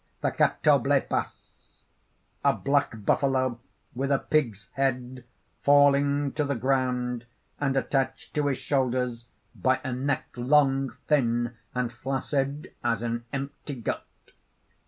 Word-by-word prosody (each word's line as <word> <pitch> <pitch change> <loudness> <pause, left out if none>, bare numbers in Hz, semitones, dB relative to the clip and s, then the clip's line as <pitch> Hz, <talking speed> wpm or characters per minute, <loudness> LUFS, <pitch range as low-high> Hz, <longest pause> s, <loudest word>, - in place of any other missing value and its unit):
_) - - -41
THE - - +1
CATOBLEPAS - - 0 0.6
(_A - - +2
black 140 -7 +1
buffalo 130 -2 +2 0.3
with 135 +2 -2
a 140 - +5
pig's 120 -10 0
head, 125 -2 -1 0.4
falling 145 0 +4
to 150 - -1
the 140 -1 -1
ground, 125 -1 0 0.3
and 135 -2 +1
attached 135 -1 -1
to 150 -1 +1
his 135 -2 0
shoulders 125 -3 -1 0.3
by 130 0 +1
a 130 -3 -2
neck 135 +2 -1
long, 135 0 +3
thin, 120 -4 +1 0.2
and 125 -1 -1
flaccid 135 +3 -2
as 115 -2 0
an 120 0 -2
empty 140 +1 -5
gut. 115 - -3
135 Hz, 120 wpm, -27 LUFS, 120-140 Hz, 0.6 s, a